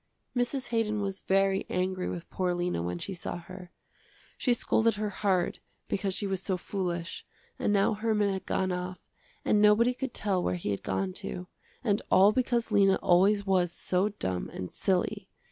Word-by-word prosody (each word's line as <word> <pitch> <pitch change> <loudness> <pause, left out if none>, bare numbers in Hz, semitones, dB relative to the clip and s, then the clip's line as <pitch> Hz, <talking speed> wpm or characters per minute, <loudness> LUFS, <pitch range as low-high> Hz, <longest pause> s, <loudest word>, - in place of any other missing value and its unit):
Mrs. 245 +2 -1
Haydon 220 -2 0
was 195 -1 -3
very 195 0 +2
angry 185 0 -1
with 170 -1 -6
poor 180 -1 0
Lena 175 - -1
when 90 +1 -3
she 195 - -5
saw 175 0 -5
her. 180 +1 -10 0.7
She 250 - 0
scolded 230 -1 +2
her 210 0 -2
hard 190 -3 0 0.3
because 195 -1 -1
she 205 - +1
was 190 -2 -1
so 190 -1 -1
foolish, 175 -2 -3 0.4
and - - +1
now 200 +1 +3
Herman 210 -2 +1
had 190 -1 -5
gone 185 -1 0
off 180 0 -3 0.5
and 210 - +3
nobody 215 +4 +5
could 260 0 -5
tell 195 -3 +1
where - - 0
he 170 -12 -3
had 100 - -2
gone 95 -1 -2
to, 180 - -5 0.4
and 205 -4 +1
all 195 +2 +7
because 240 -1 0
Lena 195 -2 +5
always 200 +3 +4
was 185 -3 +2
so 185 +3 0
dumb 95 - -3
and 90 - -6
silly. 195 +1 -1
195 Hz, 180 wpm, -29 LUFS, 180-210 Hz, 0.7 s, all